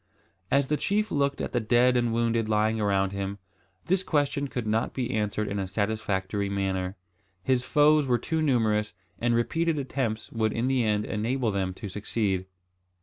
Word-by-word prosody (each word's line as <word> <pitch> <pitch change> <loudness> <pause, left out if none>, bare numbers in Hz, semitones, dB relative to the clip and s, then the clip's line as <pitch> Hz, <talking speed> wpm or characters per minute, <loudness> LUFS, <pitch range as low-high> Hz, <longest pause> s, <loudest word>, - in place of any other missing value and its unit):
As 140 0 +3
the 150 +2 0
chief 210 +5 0
looked 140 -1 0
at - - -3
the 120 - +1
dead 120 +3 +3
and 120 -1 +2
wounded 115 -1 +1
lying 110 +1 +2
around 100 -2 +1
him, 100 0 -4 0.5
this 185 +1 +2
question 145 -4 0
could 125 -3 -4
not 110 +1 0
be 125 -3 -2
answered 105 0 -1
in 100 0 -2
a 95 - -2
satisfactory 100 -1 -1
manner. 95 -1 -1 0.5
His 125 +3 +2
foes 150 +1 +4
were 125 -1 +3
too 160 +7 -2
numerous, 110 -7 +1 0.2
and 120 0 +2
repeated 165 +7 +1
attempts 130 -5 -3
would 110 -2 0
in 115 +2 0
the 130 -2 +2
end 105 -1 +1
enable 115 +2 -1
them 95 -2 -2
to 105 - -7
succeed. 100 -1 -2
115 Hz, 175 wpm, -27 LUFS, 105-130 Hz, 0.5 s, foes